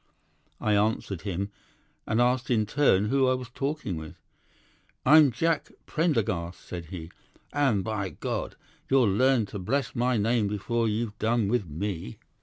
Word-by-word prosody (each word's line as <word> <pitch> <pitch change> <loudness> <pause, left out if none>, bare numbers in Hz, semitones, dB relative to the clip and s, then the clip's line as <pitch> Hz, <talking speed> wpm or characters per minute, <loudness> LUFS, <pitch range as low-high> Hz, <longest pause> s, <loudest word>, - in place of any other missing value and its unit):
"'I 105 -1 +2
answered 105 -3 0
him, 100 0 -3 0.6
and 110 - +1
asked 125 +1 +2
in 110 -4 +2
turn 105 -4 +3
who 135 0 +3
I 130 - +3
was 125 -1 -7
talking 135 - -3
with. 80 -1 -8 0.9
"'"I'm 150 +1 +8
Jack 160 +8 0 0.2
Prendergast," 105 - 0
said 85 -2 -7
he, 80 -1 -8 0.4
"and 135 -9 +2
by 105 -2 -2
God! - - -4 0.3
You'll 125 -7 +4
learn 130 0 +3
to 100 - -7
bless 130 +8 -1
my 125 0 +1
name 110 0 +2
before 115 +3 -1
you've 110 0 -2
done 110 -2 +1
with 120 -5 0
me." 80 -3 -4
110 Hz, 150 wpm, -27 LUFS, 100-130 Hz, 0.9 s, I'm